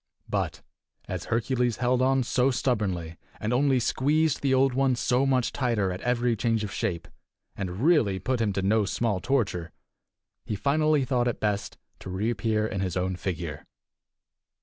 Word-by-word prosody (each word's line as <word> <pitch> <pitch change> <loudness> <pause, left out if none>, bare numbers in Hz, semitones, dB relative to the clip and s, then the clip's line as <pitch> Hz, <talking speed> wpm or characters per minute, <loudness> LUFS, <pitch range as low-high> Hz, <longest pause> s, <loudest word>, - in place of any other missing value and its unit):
But - - -2 0.4
as - - -4
Hercules 120 0 0
held 125 +1 +1
on 135 0 +3
so 125 +2 +2
stubbornly, 100 -11 -1 0.2
and 110 +3 -1
only 135 0 +3
squeezed 150 +5 +1
the 140 - +1
Old 130 0 +3
One 135 0 +2
so 125 +3 +1
much 130 -3 +1
the - - -9
tighter 115 -7 +1
at 90 - -5
every 120 -1 +1
change 115 0 0
of 105 - -5
shape, 85 -2 -2 0.5
and 95 0 -4
really 145 - +4
put 120 +6 -1
him 105 -2 +1
to 95 - -2
no 105 +2 +3
small 105 -1 0
torture, 95 -9 -1 0.7
he 105 - -3
finally 150 +4 +2
thought 125 -2 +1
it 120 - -2
best 105 0 -2 0.2
to - - -8
reappear 110 +2 0
in 100 -3 -3
his 95 -2 -2
own 90 0 -1
figure. 85 -5 -4
115 Hz, 170 wpm, -27 LUFS, 100-130 Hz, 0.7 s, really